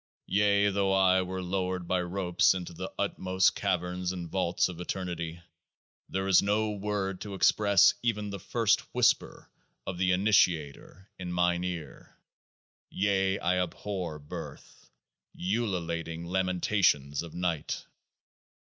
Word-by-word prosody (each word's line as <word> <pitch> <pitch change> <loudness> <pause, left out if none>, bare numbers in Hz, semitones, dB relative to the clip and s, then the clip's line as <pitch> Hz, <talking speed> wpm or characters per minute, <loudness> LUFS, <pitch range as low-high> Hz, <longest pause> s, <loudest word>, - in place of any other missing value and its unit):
Yea, 100 0 +3
though 100 0 +1
I 95 -1 +4
were 95 0 -4
lowered 90 -1 -2
by 90 0 +1
ropes 90 0 +2
into 90 -2 -5
the - - -6
utmost 95 0 +1
Caverns 90 0 -1
and 90 -2 -5
Vaults 90 0 +1
of 90 -2 -8
Eternity, 85 -2 -4 0.7
there 95 0 -2
is 95 -2 +6
no 105 +2 +1
word 100 -2 -3
to 100 -2 -6
express 100 0 +5
even 105 -4 -1
the 100 - -5
first 115 +2 +2 0.2
whisper - - +1 0.4
of 90 -2 -5
the 90 0 +2
Initiator 90 -2 +1
in 90 -1 -5
mine 90 0 +1
ear: 85 -6 -7 0.7
yea, 95 -1 +1
I 90 0 +1
abhor 90 -2 -4
birth, 75 -1 -10 0.5
ululating 85 -5 -2
lamentations 90 -5 +1
of 85 -2 -9
Night 85 -4 -2
95 Hz, 125 wpm, -29 LUFS, 90-100 Hz, 0.7 s, is